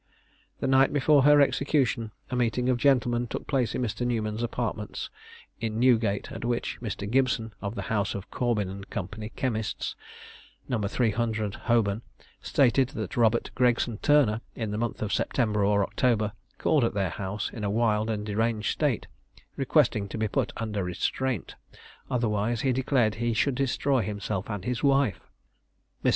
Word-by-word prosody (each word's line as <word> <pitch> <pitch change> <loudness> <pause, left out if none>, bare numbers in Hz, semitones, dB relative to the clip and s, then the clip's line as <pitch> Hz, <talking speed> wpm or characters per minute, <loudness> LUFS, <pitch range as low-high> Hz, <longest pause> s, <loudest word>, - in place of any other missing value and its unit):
The - - 0
night 135 0 +5
before 145 0 +4
her 145 0 +7
execution 135 -5 +1 0.2
a - - -1
meeting 125 +1 +1
of 125 -1 +2
gentlemen 120 -3 +2
took - - -5
place 130 -5 0
in 125 - -1
Mr. 120 +1 -2
Newman's 110 -2 -1
apartments 115 -3 -3 0.5
in 110 -1 -2
Newgate, 115 -5 +2
at - - -7
which 120 0 -2
Mr. 105 -3 -4
Gibson, 120 -2 +1
of 100 +3 -4
the - - -4
house 100 -2 -1
of 100 -1 -7
Corbyn 115 -5 0
and 100 +1 -8
Co., 95 -4 -3 0.3
chemists, 110 -5 -2 0.7
No. 120 - -1
300, 110 0 0
Holborn, 110 -3 +1 0.4
stated 130 -1 +3
that 110 -4 -4
Robert 115 -1 +2
Gregson 120 -3 +1
Turner, 125 -7 +3
in 110 -3 -3
the 105 - -2
month 115 -1 -2
of 105 - -2
September 105 -5 +1
or 100 0 +3
October, 110 -2 +1 0.3
called 150 -5 +2
at 115 - 0
their 95 -4 0
house 100 +1 -4
in 110 - -6
a 100 - 0
wild 110 0 +1
and 105 -2 -2
deranged 110 +1 0
state, - - 0 0.5
requesting 125 -7 +2
to - - -5
be 110 0 0
put - - -1
under 105 -3 -2
restraint, 105 +5 -2 0.6
otherwise 115 -2 0
he 130 -2 +2
declared 125 -4 +2
he 120 -1 +1
should 140 +4 +2
destroy 135 0 +1
himself 100 -2 -3
and 105 -4 -4 0.2
wife. 140 -5 +3 0.8
Mr. - - +4
115 Hz, 160 wpm, -27 LUFS, 105-125 Hz, 0.8 s, her